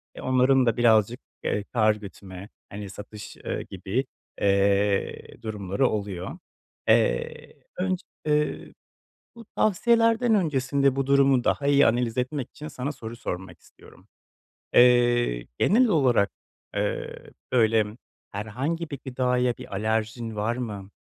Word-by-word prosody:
Eee, - - -8
onların 130 0 +3
da 115 -1 +1
birazcık, 115 0 +3 0.2
eee, 105 - -1
kâr 110 -2 +3
gütme, 100 -1 -10 0.2
hani 100 -1 -7
satış, 105 +1 -10
eee, - - -4
gibi, 95 +8 -2 0.4
eee, 100 0 +1
durumları 105 +3 -1
oluyor. 100 -4 -4 0.5
Eee, - - +1 0.2
önce, 185 +1 -1 0.2
eee, 150 0 0 0.6
bu 230 -1 -12
tavsiyelerden 230 +2 +3
öncesinde 140 -5 +1
bu 135 0 -1
durumu 135 -2 +4
daha 140 - 0
iyi 145 0 +5
analiz 120 0 0
etmek 130 +1 -2
için 150 - -9
sana 140 -1 -4
soru 115 -4 -8
sormak 95 -5 -6
istiyorum. - - -19 0.7
Eee, 120 - +4
genel 240 +6 +4
olarak, 125 - +3 0.4
eee, - - -3 0.2
böyle, 110 -3 +3 0.5
herhangi 130 +11 -3
bir 140 -3 -6
gıdaya 125 -1 0
bir - - -11
alerjin 110 +2 -2
var 110 +3 -1
mı? 105 -5 -5
120 Hz, 125 wpm, -25 LUFS, 105-140 Hz, 0.7 s, iyi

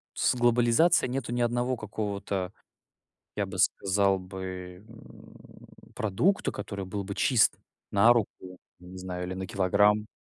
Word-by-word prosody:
с - - +2
глобализацией 120 +5 +3
нету 130 -3 -3
ни 120 0 -1
одного 120 +2 0
какого-то, 100 -3 -4 0.8
я - - -1
бы - - -7
сказал 100 0 +2
бы, 95 0 -8
м, 115 0 -16 0.3
продукта, 160 - +1
который 100 -2 -6
был 100 +2 -4
бы 100 +1 -6
чист 120 -5 +3 0.3
на 110 +4 +6
руку, 115 -4 +1 0.5
я 90 - -15
не 95 - -10
знаю, 90 -1 -5
или 90 - -5
на 95 0 -5
килограмм. 105 +3 +2
100 Hz, 140 wpm, -28 LUFS, 95-120 Hz, 0.8 s, на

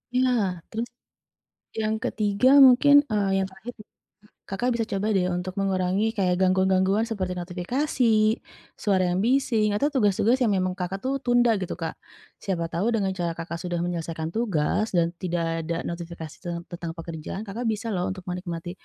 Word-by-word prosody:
Iya, 255 0 +3 0.4
terus, 230 +2 -3 0.9
yang 215 0 0
ketiga 210 +3 +2 0.2
mungkin, 285 +3 +7
eee, 205 -2 +1
yang 190 - -1
terakhir 190 +6 -9
nih. - - -19 0.6
Kakak 240 +6 -1
bisa 225 - 0
coba 200 +2 -1
deh 180 -1 +2
untuk 180 +1 -3
mengurangi 195 +2 +1
kayak 180 -2 +2
gangguan-gangguan 190 +2 +3
seperti 190 -5 -2
notifikasi, 190 - -1 0.8
suara 195 -3 +2
yang 180 - 0
bising, 235 -5 +2
atau 285 +8 +2
tugas-tugas 215 +1 +3
yang 210 - +2
memang 185 -1 0
Kakak 185 +2 -3
tuh 265 +1 -1
tunda 245 -1 +4
gitu 185 - -4
Kak. 165 - -4 0.5
Siapa 180 -4 -1
tahu 180 +6 0
dengan 200 -3 +1
cara 170 -1 -1
Kakak 170 0 -5
sudah 175 -1 -2
menyelesaikan 165 -2 -3
tugas 210 -1 0
dan 170 -1 +4
tidak 165 -2 -2
ada 170 0 -1
notifikasi 170 -2 -7
ten 170 -1 -3
tentang 170 -1 -5
pekerjaan 165 +3 -6
Kakak 220 +4 -5
bisa 220 +1 -1
loh 180 -3 -1
untuk 190 0 -5
menikmati 175 -1 -4
190 Hz, 160 wpm, -25 LUFS, 175-220 Hz, 0.9 s, mungkin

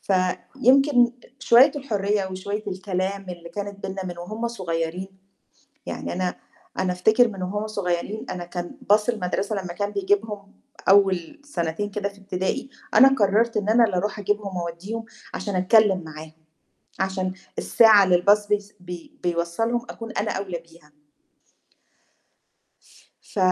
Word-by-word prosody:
فيمكن 245 +7 +3 0.3
شوية 265 +2 +6
الحرّية 210 -7 0
وشوية 200 +3 -4
الكلام 190 +1 -3
اللي 170 -1 -8
كانت 200 0 -6
بيننا 190 0 -5
من 175 -1 -6
وهُم 215 +7 -4
صغيّرين، 180 -3 -3 0.8
يعني - - -4
أنا 180 0 -1 0.4
أنا 185 -1 +1
أفتكر 220 +7 +4
من 195 -3 -7
وهُم 205 +4 -2
صغيّرين 200 0 -3
أنا 175 - -4
كان 175 +9 -6
bus 210 +1 +4
المدرسة 205 -1 -1
لمّا 180 -3 -4
كان 205 +1 -2
بيجيبهم 205 0 -1 0.3
أول 195 - +3
سنتين 180 - -3
كده 200 0 -2
في 200 0 -16
ابتدائي، 195 +7 -3 0.2
أنا 265 - +9
قرّرت 230 -2 +2
إن 205 -1 0
أنا 230 +2 +6
اللي 205 -5 0
أرُوح 205 +3 -1
أجيبهم 205 -1 -2
وأودّيهم 175 +7 -4 0.3
عشان 200 -3 -3
أتكلم 190 -1 +4
معاهم، 155 0 -9 0.7
عشان 190 -1 -1 0.2
الساعة 220 -3 +6
اللي 180 -2 +3
الbus 205 +1 +4
بيس 205 0 -1
بي 180 - -9
بيوصّلهم 175 +8 0
أكون 230 0 -7
أنا 215 - -1
أولى 190 -3 -3
بيها. 165 -2 -20 2.3
ف - - -10
200 Hz, 135 wpm, -24 LUFS, 180-215 Hz, 2.3 s, أنا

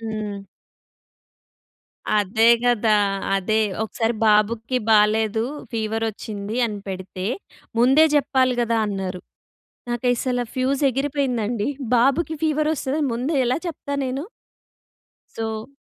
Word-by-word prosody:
హ్మ్. 215 -3 -5 1.8
అదే 215 +3 +2 0.2
కదా! 230 -3 +3 0.4
అదే 205 +3 +1 0.3
ఒకసారి 225 +1 -1
బాబుకి 220 +4 +2
బాలేదు. 220 +1 +3 0.3
ఫీవర్ 225 0 -1
వచ్చింది 210 +1 -6
అని 210 -2 -5
పెడితే, 185 0 -5 0.5
"ముందే 265 +6 +6
చెప్పాలి 260 -2 +2
కదా!" 230 -1 +1
అన్నారు. 190 -2 -4 0.7
నాకసలు 245 +1 0
ఫ్యూజ్ 265 +2 0
ఎగిరిపోయిందండి. 250 -5 -1 0.3
బాబుకి 275 +7 +2
ఫీవర్ 305 -1 +1
వస్తదని 285 +2 -1
ముందే 255 +7 -1
ఎలా 250 - +1
చెప్తా 285 -4 -5
నేను? 265 +4 -3 1.1
సో 220 0 -4
230 Hz, 100 wpm, -22 LUFS, 215-260 Hz, 1.8 s, ముందే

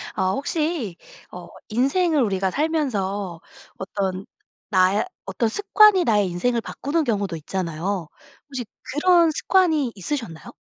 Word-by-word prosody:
아 190 0 +1
혹시 285 - -2 0.3
어 180 -1 -9 0.2
인생을 285 +7 +2
우리가 195 -4 0
살면서 205 - -1 0.4
어떤 190 -1 -3 0.4
나의 190 +2 +3 0.2
어떤 195 +4 -1
습관이 410 - +5
나의 210 -5 +2
인생을 235 +8 0
바꾸는 305 +8 -2
경우도 200 -7 -1
있잖아요. 170 +2 -3 0.4
혹시 260 -4 -5 0.2
그런 335 +3 +3
습관이 315 -6 +2
있으셨나요? 195 - -5
220 Hz, 275 characters per minute, -23 LUFS, 190-305 Hz, 0.4 s, 습관이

